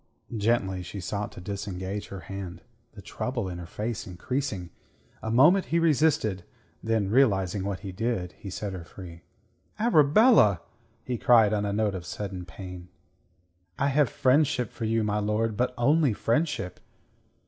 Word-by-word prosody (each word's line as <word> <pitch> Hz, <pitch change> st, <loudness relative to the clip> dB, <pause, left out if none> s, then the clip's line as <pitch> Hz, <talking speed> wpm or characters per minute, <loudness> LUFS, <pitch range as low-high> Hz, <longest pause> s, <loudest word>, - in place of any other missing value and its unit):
Gently 100 Hz, -4 st, +1 dB
she 95 Hz, +3 st, -7 dB
sought 100 Hz, +3 st, -3 dB
to -, -, -10 dB
disengage 100 Hz, 0 st, -5 dB
her 100 Hz, -1 st, -8 dB
hand, 95 Hz, -3 st, -7 dB, 0.3 s
the -, -, -12 dB
trouble 125 Hz, -5 st, -3 dB
in 90 Hz, -1 st, -6 dB
her 85 Hz, -, -8 dB
face 110 Hz, +3 st, -4 dB
increasing. 95 Hz, -1 st, -3 dB, 0.5 s
A 110 Hz, -, -4 dB
moment 155 Hz, +12 st, +5 dB
he 165 Hz, -, 0 dB
resisted; 150 Hz, -, +2 dB, 0.4 s
then, 110 Hz, -3 st, 0 dB
realizing 100 Hz, -7 st, +2 dB
what 100 Hz, -1 st, -3 dB
he 100 Hz, -2 st, -6 dB
did, 95 Hz, -3 st, -2 dB
he 100 Hz, -, -10 dB
set 100 Hz, +1 st, -4 dB
her 90 Hz, -2 st, -6 dB
free. 85 Hz, -1 st, -11 dB, 0.6 s
"Arabella!" 160 Hz, -, +5 dB, 0.4 s
he 125 Hz, -3 st, -3 dB
cried 110 Hz, -4 st, +5 dB
on 105 Hz, -1 st, 0 dB
a 100 Hz, -, -1 dB
note 105 Hz, 0 st, 0 dB
of 90 Hz, -3 st, -6 dB
sudden 95 Hz, -2 st, -5 dB
pain. 90 Hz, 0 st, -9 dB, 0.9 s
"I 140 Hz, -, +1 dB
have 145 Hz, -1 st, +3 dB
friendship 130 Hz, -3 st, +2 dB
for 115 Hz, -, -5 dB
you, 115 Hz, 0 st, +1 dB
my 105 Hz, 0 st, 0 dB
lord. 105 Hz, +1 st, 0 dB
But 125 Hz, +4 st, +1 dB
only 145 Hz, +1 st, +3 dB
friendship." 115 Hz, -, -1 dB
105 Hz, 155 wpm, -27 LUFS, 95-125 Hz, 0.9 s, moment